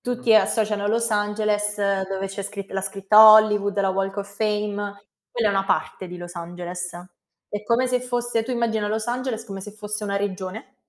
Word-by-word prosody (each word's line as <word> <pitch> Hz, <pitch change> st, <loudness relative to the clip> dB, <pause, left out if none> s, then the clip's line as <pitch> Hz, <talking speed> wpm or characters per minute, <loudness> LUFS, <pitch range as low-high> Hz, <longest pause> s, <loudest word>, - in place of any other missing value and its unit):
tutti 245 Hz, -2 st, +1 dB
associano 210 Hz, -2 st, +2 dB
Los 230 Hz, +1 st, +1 dB
Angeles 210 Hz, 0 st, 0 dB, 0.3 s
dove 195 Hz, 0 st, -3 dB
c'è 195 Hz, +1 st, -6 dB
scri 200 Hz, 0 st, -6 dB
la 195 Hz, -, -2 dB
scritta 195 Hz, +2 st, +3 dB
Hollywood, 210 Hz, -2 st, +4 dB
la 195 Hz, -1 st, +1 dB
Walk 195 Hz, +1 st, -2 dB
of 200 Hz, 0 st, -6 dB
Fame. 205 Hz, -1 st, -2 dB, 0.3 s
Quella 230 Hz, -3 st, 0 dB
è -, -, +2 dB
una 195 Hz, 0 st, +1 dB
parte 190 Hz, -1 st, -2 dB
di 180 Hz, -, -8 dB
Los 175 Hz, 0 st, -9 dB
Angeles. 175 Hz, +1 st, -6 dB, 0.6 s
È 205 Hz, 0 st, -5 dB
come 235 Hz, +4 st, +1 dB
se 250 Hz, 0 st, 0 dB
fosse 240 Hz, -2 st, -1 dB
tu 250 Hz, -, -6 dB
immagina 225 Hz, -4 st, 0 dB
Los 215 Hz, +1 st, -2 dB
Angeles 240 Hz, -2 st, -3 dB
come 195 Hz, -3 st, -7 dB
se 210 Hz, -, -8 dB
fosse 210 Hz, 0 st, -5 dB
una 200 Hz, -1 st, -2 dB
regione 200 Hz, +5 st, -5 dB
210 Hz, 185 wpm, -23 LUFS, 195-220 Hz, 0.6 s, Hollywood